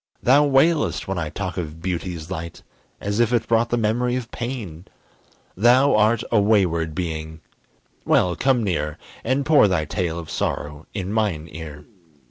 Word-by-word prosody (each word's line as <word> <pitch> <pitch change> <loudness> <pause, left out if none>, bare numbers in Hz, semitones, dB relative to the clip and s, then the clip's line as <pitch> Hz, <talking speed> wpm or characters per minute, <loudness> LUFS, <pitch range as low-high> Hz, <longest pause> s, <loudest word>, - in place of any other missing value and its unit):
Thou 140 +4 +5
wailest 150 +3 +2
when 95 -2 -2
I 80 -2 -3
talk 90 +3 -5
of 80 -2 -5
beauty's 85 -1 -4
light, 85 -2 -6 0.4
As 100 +2 -2
if 120 -1 +3
it 115 -2 +1
brought 115 +1 +2
the 120 - +1
memory 120 +3 0
of 120 -2 -5
pain. 110 -9 -6 0.7
Thou 125 +7 +4
art 110 +2 +3
a 110 -3 +4
wayward 85 -7 +1
being 80 -3 -4 0.6
well, 90 -1 +2
come 130 -3 +2
near, 75 -6 -2 0.3
And 130 +4 0
pour 150 -8 +6
thy 90 -5 0
tale 80 +2 -2
of 85 -2 -7
sorrow 75 +1 -3
in 95 0 -3
mine 100 -8 -1
ear. 75 -3 -9
95 Hz, 160 wpm, -22 LUFS, 80-120 Hz, 0.7 s, pour